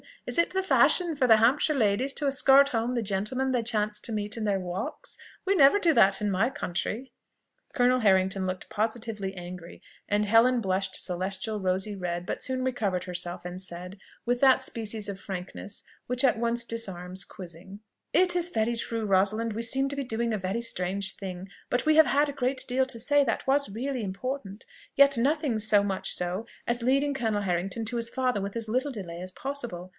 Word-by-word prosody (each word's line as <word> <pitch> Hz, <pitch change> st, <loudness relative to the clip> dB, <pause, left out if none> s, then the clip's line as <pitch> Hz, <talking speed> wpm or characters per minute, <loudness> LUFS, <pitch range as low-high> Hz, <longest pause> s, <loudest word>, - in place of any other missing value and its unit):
is -, -, -1 dB
it 340 Hz, -, +3 dB
the 380 Hz, 0 st, -1 dB
fashion 355 Hz, -3 st, +3 dB
for 275 Hz, -3 st, +1 dB
the 225 Hz, -2 st, +7 dB
Hampshire 255 Hz, +7 st, +3 dB
ladies 245 Hz, +3 st, +1 dB
to 295 Hz, -, -2 dB
escort 275 Hz, 0 st, +6 dB
home 235 Hz, -1 st, -1 dB
the 235 Hz, -, 0 dB
gentlemen 215 Hz, +7 st, -1 dB
they 250 Hz, -2 st, +1 dB
chance 215 Hz, -2 st, 0 dB
to -, -, -2 dB
meet 210 Hz, 0 st, -3 dB
in 225 Hz, -, -3 dB
their 200 Hz, -2 st, +1 dB
walks? 180 Hz, 0 st, -5 dB, 0.3 s
We 390 Hz, +1 st, +2 dB
never 280 Hz, +2 st, +6 dB
do 335 Hz, -4 st, +3 dB
that 195 Hz, -5 st, +5 dB
in 210 Hz, -, 0 dB
my 195 Hz, +6 st, +1 dB
country." 230 Hz, +5 st, -4 dB, 0.6 s
Colonel 250 Hz, -1 st, +3 dB
Harrington 190 Hz, -3 st, +2 dB
looked 185 Hz, 0 st, -5 dB
positively 220 Hz, -3 st, -3 dB
angry, 175 Hz, -1 st, -9 dB, 0.3 s
and 210 Hz, +1 st, +1 dB
Helen 230 Hz, +4 st, +4 dB
blushed 190 Hz, -1 st, -1 dB
celestial 190 Hz, +4 st, -1 dB
rosy 190 Hz, +2 st, -1 dB
red, 175 Hz, -2 st, -4 dB
but -, -, -4 dB
soon 260 Hz, -1 st, -1 dB
recovered 205 Hz, -8 st, -1 dB
herself, 180 Hz, -1 st, -3 dB
and 180 Hz, +1 st, -6 dB
said, 180 Hz, +1 st, -7 dB, 0.3 s
with 245 Hz, 0 st, 0 dB
that 265 Hz, -1 st, +5 dB
species 220 Hz, -4 st, -3 dB
of 195 Hz, -1 st, -6 dB
frankness 190 Hz, +1 st, -7 dB, 0.2 s
which 250 Hz, +1 st, 0 dB
at 255 Hz, -3 st, +3 dB
once 235 Hz, 0 st, 0 dB
disarms 185 Hz, -5 st, -3 dB
quizzing, 185 Hz, +2 st, -10 dB, 0.3 s
"It 360 Hz, +1 st, +4 dB
is 350 Hz, 0 st, +4 dB
very 230 Hz, -5 st, 0 dB
true, 230 Hz, -1 st, -3 dB
Rosalind; 210 Hz, +3 st, +2 dB
we 225 Hz, -, -3 dB
seem 270 Hz, +4 st, +2 dB
to 280 Hz, -, -5 dB
be 280 Hz, -, -2 dB
doing 235 Hz, -1 st, -1 dB
a -, -, 0 dB
very 190 Hz, +5 st, -2 dB
strange 195 Hz, -3 st, -1 dB
thing: 190 Hz, -1 st, -7 dB, 0.2 s
but 245 Hz, -, 0 dB
we 310 Hz, 0 st, +4 dB
have 315 Hz, -, +8 dB
had 290 Hz, +1 st, +2 dB
a -, -, -5 dB
great 260 Hz, +1 st, +2 dB
deal 260 Hz, +1 st, +2 dB
to 235 Hz, -3 st, -2 dB
say 290 Hz, +4 st, +3 dB
that 230 Hz, -4 st, -2 dB
was 280 Hz, -1 st, +2 dB
really 250 Hz, +3 st, -3 dB
important; 200 Hz, +1 st, -5 dB, 0.3 s
yet 280 Hz, -2 st, +6 dB
nothing 280 Hz, -1 st, +1 dB
so 210 Hz, -1 st, +3 dB
much 195 Hz, -2 st, 0 dB
so, 180 Hz, +5 st, -2 dB, 0.2 s
as 240 Hz, 0 st, -1 dB
leading 275 Hz, +3 st, +2 dB
Colonel 220 Hz, -5 st, -1 dB
Harrington 195 Hz, +4 st, -2 dB
to 240 Hz, +2 st, -1 dB
his 230 Hz, 0 st, -1 dB
father 255 Hz, -3 st, -1 dB
with 200 Hz, +2 st, -5 dB
as 225 Hz, -1 st, -4 dB
little 255 Hz, +5 st, 0 dB
delay 180 Hz, -8 st, -7 dB
as 185 Hz, 0 st, -4 dB
possible. 240 Hz, -8 st, -6 dB
220 Hz, 200 wpm, -27 LUFS, 190-255 Hz, 0.6 s, have